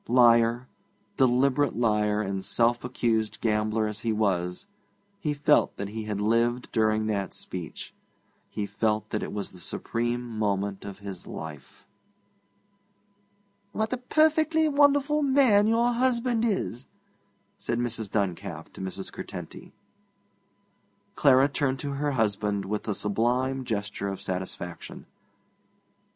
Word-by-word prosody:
Liar, 120 0 +4 0.5
deliberate 135 +2 +3
liar 105 -2 +2
and 95 -1 -3
self 120 +3 +2
accused 115 -3 -1
gambler 110 0 +1
as 105 0 -4
he 115 0 -1
was, 95 - 0 0.5
he 160 -6 -1
felt 145 0 +2
that 100 0 -4
he 110 +1 -5
had 105 -2 -3
lived 115 +3 +1
during 110 -1 +2
that 100 -4 -2
speech; 90 -4 -6 0.6
he 105 - -3
felt 105 +1 -1
that 105 - -1
it - - -4
was 105 -1 -4
the 90 - -12
supreme 120 +7 -2 0.2
moment 100 -2 -1
of 100 -1 -7
his 95 -3 -7
life. 75 -3 -9 1.9
'What 220 +2 -1
a - - 0
perfectly 315 +4 +3
wonderful 285 0 +3
man 260 -7 +4
your 235 +2 +3
husband 240 -1 +1
is!' 190 - -2 0.7
said 120 - -2
Mrs. 115 -3 -2
Duncalf 100 -4 -3
to - - -9
Mrs. 95 0 -5
Curtenty. - - -8 1.4
Clara 135 -1 +5
turned 140 -2 -1
to 140 +1 -4
her 145 +1 -1
husband 105 -3 0
with 105 +3 -3
a 105 - 0
sublime 125 +5 0
gesture 100 -3 -3
of 95 -1 -4
satisfaction. 90 -2 -6
115 Hz, 125 wpm, -27 LUFS, 105-140 Hz, 1.9 s, Clara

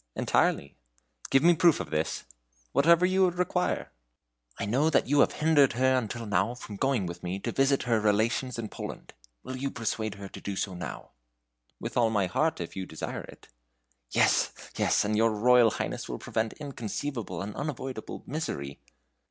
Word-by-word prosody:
"Entirely." 70 - +1 0.6
"Give 135 +1 +4
me 175 - +7
a - - -2
proof 170 -1 +4
of - - -5
this?" 80 +1 -1 0.5
"Whatever 170 - +5
you 185 0 +4
require." 180 0 -1 0.7
"I - - -2
know 130 +9 +2 0.2
you 145 +2 +2
have - - +4
hindered 150 -4 +4
her 130 +2 +3
until 115 -1 -2
now 105 +4 +1
from 110 -4 -9
going 130 -2 +1
with 85 0 -6
me 90 +2 -3
to 100 - -3
visit 135 0 +2
her 115 -3 +2
relations 110 +4 +1
in 115 -2 -3
Poland. - - -8 0.3
Will 130 +1 -6
you 135 +1 -2
persuade 110 -3 -3
her 100 0 -8
to - - -11
do 100 - -4
so 95 0 -2
now?" 90 -1 -7 0.7
"With - - -5
all 115 -2 +4
my 105 -3 +1
heart, 155 - 0
if 85 - -6
you 95 -1 -4
desire 80 - -5
it." - - -14 0.6
"Yes, - - +3 0.2
yes! - - +2
and 105 +1 0
your 115 +2 +4
Royal 120 +2 +5
Highness - - -4
will - - -3
prevent 110 0 -2
inconceivable 135 -3 -5
and 100 +1 -6
unavoidable 135 -5 -5
misery." 70 - -4
120 Hz, 175 wpm, -28 LUFS, 105-140 Hz, 0.7 s, me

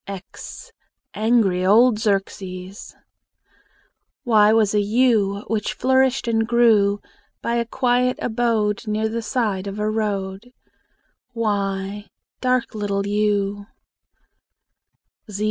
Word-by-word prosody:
x 200 - -9 0.4
Angry 215 -5 +2
old 215 +4 +5
Xerxes! 195 -2 -3 1.3
Y 215 -3 +5
was 220 -2 +3
a 210 - +3
yew, 210 -2 +2
Which 215 -2 -2
flourished 260 -1 +1
and 225 -1 +1
grew 220 -4 +3 0.4
By 235 0 0
a 235 - 0
quiet 250 0 +1
abode 220 -3 -1
Near 215 +1 0
the 230 +1 -3
side 215 -5 -2
of 200 +1 -5
a 210 0 -1
road. 205 +1 -3 0.8
y 200 -2 -2 0.3
Dark 255 -1 0
little 200 -2 -2
yew! 205 -1 -1
215 Hz, 100 wpm, -21 LUFS, 200-235 Hz, 1.3 s, old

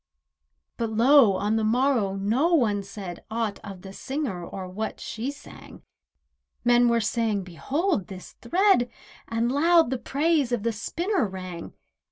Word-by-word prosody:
But 230 -2 -1
lo! 235 0 +5
on 210 +3 0
the 220 - 0
morrow 230 -3 +2
no 240 - +2
one 210 -8 +2
said 195 -3 -8
Aught 225 -2 -2
of 195 -3 -9
the 190 0 -9
singer 260 - -4
or 185 +2 -7
what 210 +4 -5
she 230 +4 -4
sang. 285 0 -12 0.8
Men 240 0 +5
were 235 0 +3
saying: 220 -2 0
"Behold 265 - -2
this 190 -3 -10
thread," 370 -9 +3 0.4
And 230 +1 0
loud 325 0 +4
the 260 - -1
praise 290 -1 +1
of 240 -4 -1
the 230 0 0
spinner 340 - -1
rang. 185 -3 -8
230 Hz, 150 wpm, -25 LUFS, 200-275 Hz, 0.8 s, lo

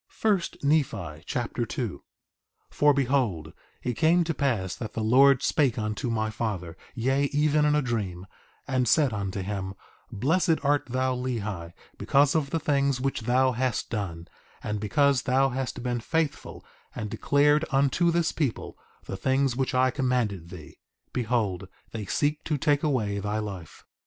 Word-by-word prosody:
1 210 -4 +3 0.2
Nephi 105 - 0
Chapter - - -2
2 - - -4 0.7
2:1 - - -21
For 145 0 +5
behold, 125 - 0 0.3
it 125 - -1
came 165 +4 +3
to 165 0 -2
pass 115 - -1
that 110 - -7
the 110 - -2
Lord 135 +4 +5
spake 135 -6 +2
unto 110 +3 -2
my 110 -1 -1
father, 100 -7 -4 0.2
yea, 135 +3 +1
even 150 +1 +2
in 150 0 +3
a 150 - +2
dream, 100 -7 -3 0.4
and 130 -2 +1
said 145 -7 +3
unto 100 -2 -3
him: 95 -1 -4 0.4
Blessed 165 - +2
art 145 0 +2
thou 130 +1 0
Lehi, 110 -9 -4 0.3
because 140 0 +3
of 155 -4 0
the 165 - -1
things 140 -3 +1
which 135 -1 -1
thou 130 +3 +3
hast 125 -1 -2
done; 90 -6 -4 0.4
and 105 -1 -2
because 140 +5 +2
thou 135 +2 +2
hast 130 -1 -4
been 120 -1 -1
faithful 155 +4 -2 0.3
and 105 -1 -4
declared 145 +2 +3
unto 140 +5 +2
this 170 -1 +1
people 140 -8 -3 0.3
the - - -5
things 130 +5 +1
which 130 0 -1
I 130 0 +3
commanded 120 - -1
thee, 85 -4 -11 0.3
behold, 110 -6 -1 0.2
they 110 -3 -5
seek 150 +7 0
to 150 - 0
take 145 0 +2
away 110 -9 0
thy 105 +2 -2
life. 100 -6 -7
125 Hz, 160 wpm, -27 LUFS, 105-140 Hz, 0.7 s, For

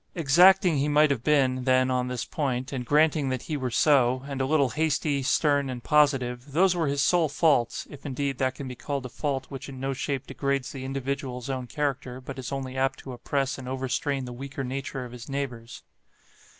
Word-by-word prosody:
Exacting 175 +2 +5
he 140 +2 +1
might 150 0 +4
have 125 -4 -1
been, 130 -4 +2
then, 130 0 +3
on 125 0 0
this 125 -1 -3
point; 130 -3 -2
and 130 -2 -3
granting 150 -1 +3
that 130 -2 -3
he 155 - -3
were 130 -3 -2
so, 130 0 +3
and 135 -2 -3
a 130 - 0
little 140 -3 +3
hasty, 150 -1 0
stern, 140 +1 +2
and 125 -2 -6
positive, 135 -3 +2
those 180 +3 +4
were 165 -3 0
his 140 0 +1
sole 170 -4 +3
faults 145 -5 +2
(if, 145 - -12
indeed, 135 -1 -3
that 130 -1 0
can 140 - -7
be 125 - -5
called 140 +2 -4
a - - -5
fault 135 0 -2
which 135 0 -7
in 130 -1 -9
no 135 +1 -2
shape 135 0 -3
degrades 140 0 -2
the 135 -4 -7
individual's 135 -1 -3
own 130 -2 -4
character; 135 -1 -3
but 130 +1 -8
is 130 - -6
only 135 -1 -4
apt 135 0 0
to 130 - -9
oppress 135 +2 -2
and 130 - -8
overstrain 130 +1 -2
the 125 - -7
weaker 135 +2 -6
nature 135 0 -4
of 120 - -10
his 120 +1 -10
neighbours). 125 -4 -5
135 Hz, 210 wpm, -26 LUFS, 130-145 Hz, -, Exacting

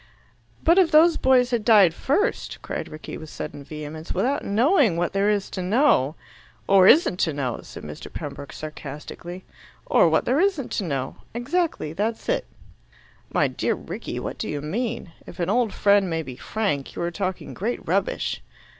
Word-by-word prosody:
"But 335 +4 +5
if 360 -4 +5
those 325 +1 +6
boys 255 -1 +3
had 235 -3 0
died 205 -7 +6
first," 295 - -1
cried - - -4
Rickie 155 - -8
with 155 - -9
sudden 145 -2 -7
vehemence, 155 +2 -7
"without 275 +4 0
knowing 230 - +3
what 175 +1 -1
there 200 +1 +2
is 205 -2 0
to 185 - -4
know 180 - +3 0.3
" - - -29
"Or 195 -1 +6
isn't 275 - +5
to 160 - +1
know!" 130 -4 -2
said - - -11
Mr. 75 0 -8
Pembroke 140 - -7
sarcastically. 155 +4 -8 0.4
"Or - - +4
what - - +2
there 260 +4 +2
isn't 360 -9 +1
to 205 - -1
know. 135 -5 -3 0.2
Exactly. 275 - -1
That's 220 +5 -2
it." - - 0 0.8
"My - - +3
dear - - -1
Rickie, - - -6
what - - -5
do 220 - -3
you 145 - -2
mean? 215 - -3 0.2
If - - -11
an 175 +2 0
old 235 -1 +2
friend 200 -2 +3
may 165 -1 -1
be 130 -4 -8
frank, 170 - -2
you - - -3
are 170 - -1
talking 185 0 -4
great 230 +6 -3
rubbish." - - -1
200 Hz, 180 wpm, -24 LUFS, 160-250 Hz, 0.8 s, those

